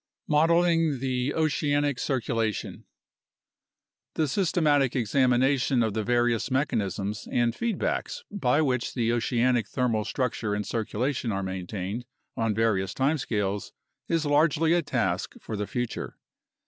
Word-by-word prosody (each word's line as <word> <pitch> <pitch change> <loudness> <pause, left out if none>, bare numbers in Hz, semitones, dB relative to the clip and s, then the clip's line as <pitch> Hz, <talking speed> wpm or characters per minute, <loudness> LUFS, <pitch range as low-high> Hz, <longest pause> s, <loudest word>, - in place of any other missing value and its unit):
Modeling 165 0 +3
the 130 +1 -1
Oceanic 145 -3 +1
Circulation 115 -5 -2 1.3
The 155 - +1
systematic 150 -5 +2
examination 130 +1 +2
of 110 -2 -1
the 110 - -1
various 120 0 +1
mechanisms 105 -7 -1
and 120 -1 +2
feedbacks 235 - -2
by 150 -6 +2
which 125 -4 -1
the 115 -2 +1
oceanic 120 -1 +1
thermal 115 -4 0
structure 110 -3 -2
and 105 0 -2
circulation 115 +2 -2
are 100 -1 -2
maintained 95 +4 -4 0.3
on 115 -3 0
various 100 -3 +1
time 145 +4 +1
scales 105 -4 -2 0.3
is 165 -2 0
largely 155 +2 +3
a 175 - +3
task 95 - -1
for 110 - -6
the 105 -1 -3
future. 120 -1 -4
125 Hz, 120 wpm, -27 LUFS, 110-145 Hz, 1.3 s, Modeling